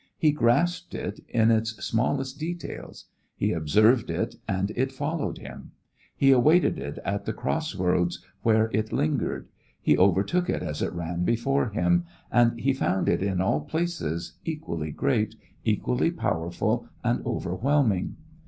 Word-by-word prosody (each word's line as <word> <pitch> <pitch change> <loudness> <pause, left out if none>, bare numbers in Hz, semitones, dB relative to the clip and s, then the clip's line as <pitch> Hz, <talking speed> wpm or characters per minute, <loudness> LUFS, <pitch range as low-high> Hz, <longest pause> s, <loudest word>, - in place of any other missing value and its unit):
He 155 - +4
grasped 170 +7 +1
it 100 +3 -4
in 115 -1 +4
its 110 0 +1
smallest 130 +4 -1
details; 170 +2 -6 0.3
he - - 0
observed 105 - +3
it - - -1
and 95 +2 0
it 130 +2 0
followed 145 +3 -2
him; - - -10 0.4
he 135 -1 +5
awaited 150 +8 +4
it 70 0 -5
at 100 +1 -2
the 110 - -2
cross 155 +2 -2
roads 90 -2 +1 0.2
where 110 0 +3
it 110 +1 0
lingered; 80 - -1 0.3
he - - +3
overtook 100 - +2
it - - -1
as 75 -3 -4
it - - 0
ran 85 0 -3
before 120 +5 +1
him, 90 -4 +2 0.3
and 120 0 +3
he 135 +2 +2
found 95 -7 0
it - - +2
in 95 -2 0
all 75 -6 +1
places 155 - -3
equally 120 - -4
great, 110 - 0 0.3
equally 60 -1 +1
powerful 80 +2 -1 0.2
and - - +1
overwhelming. 110 0 0
110 Hz, 145 wpm, -26 LUFS, 90-135 Hz, 0.4 s, he